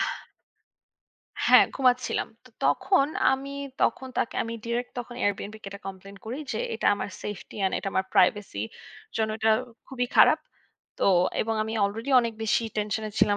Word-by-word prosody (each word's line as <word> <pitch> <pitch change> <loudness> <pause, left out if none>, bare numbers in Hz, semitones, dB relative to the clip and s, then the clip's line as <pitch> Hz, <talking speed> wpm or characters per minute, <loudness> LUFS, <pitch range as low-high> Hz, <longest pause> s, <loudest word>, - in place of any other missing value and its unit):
হা - - -10 1.3
হ্যাঁ, - - +8
ঘুমাচ্ছিলাম। 255 -1 +1 0.2
তো - - -17
তখন 370 -8 +3 0.3
আমি 270 +1 -3 0.3
তখন 260 - +1
তাকে - - -1
আমি 230 - -5
ডিরেক্ট 240 +1 -2
তখন 240 0 -6
Airbnb 205 +1 -1
কে 195 - -6
এটা 200 - -9
কমপ্লেইন 195 +1 -9
করি 240 +6 -5
যে, 220 - -2 0.2
এটা 225 - -2
আমার 205 - -4
সেফটি 205 -3 -7
অ্যান্ড 190 -1 +1
এটা 195 - -3
আমার 190 - +1
প্রাইভেসির 110 - +2 0.5
জন্য 220 -1 +1
এটা 220 +1 +3 0.4
খুবই 250 -2 -2
খারাপ। - - +7 0.6
তো - - +1 0.4
এবং 225 0 -1
আমি 220 +1 -4
আলরেডি 225 +7 -3
অনেক 230 -1 -2
বেশি 220 +1 +2
টেনশনে 215 +1 -2
ছিলাম। 205 0 +4
220 Hz, 160 wpm, -27 LUFS, 205-245 Hz, 1.3 s, হ্যাঁ